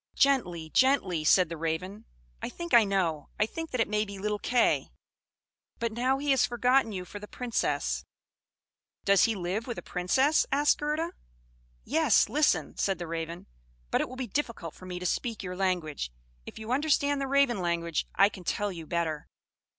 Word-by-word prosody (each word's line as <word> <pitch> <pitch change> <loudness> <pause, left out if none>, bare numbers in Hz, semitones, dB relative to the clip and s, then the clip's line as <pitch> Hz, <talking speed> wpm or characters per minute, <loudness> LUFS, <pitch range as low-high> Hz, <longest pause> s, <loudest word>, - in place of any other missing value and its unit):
"Gently, 175 - +1
gently," 200 - +3
said 180 +3 +5
the 165 0 -6
Raven. 175 +7 -3 0.4
"I - - -3
think 345 0 -7
I 235 -2 +8
know; 175 -7 -1
I 210 - +4
think 325 +8 -6
that 255 - -3
it 225 - +3
may 210 0 +1
be 200 -2 -8
little 210 +1 -2
Kay. 245 +2 +2 0.9
But 230 -1 -2
now 255 +4 +1
he 285 +1 0
has 270 - +4
forgotten 245 0 +2
you 185 -3 -5
for 205 - -8
the 210 - -9
Princess." 245 0 -1 1.0
"Does 200 -1 +5
he 225 - 0
live 190 +5 -3
with 240 - -4
a - - -6
Princess?" 260 - +2
asked 290 +1 +3
Gerda. 305 +3 -1 0.7
"Yes 300 -3 +3
listen," 280 - +1
said 195 -2 0
the 175 - -5
Raven; 165 +1 -5 0.5
"but - - +2
it - - -3
will 255 - -8
be 255 0 -3
difficult 230 - -3
for 185 - -12
me 180 -1 -5
to 180 - -6
speak 225 +4 -2
your 180 -1 -5
language. 175 - -1 0.4
If - - -9
you 220 +1 -6
understand 285 0 +2
the 275 - -1
Raven 270 -6 +3
language 170 -2 -1
I 195 - +6
can 195 -3 -9
tell 205 +3 -1
you 165 -3 -8
better." 160 -3 -2
210 Hz, 185 wpm, -29 LUFS, 175-260 Hz, 1.0 s, I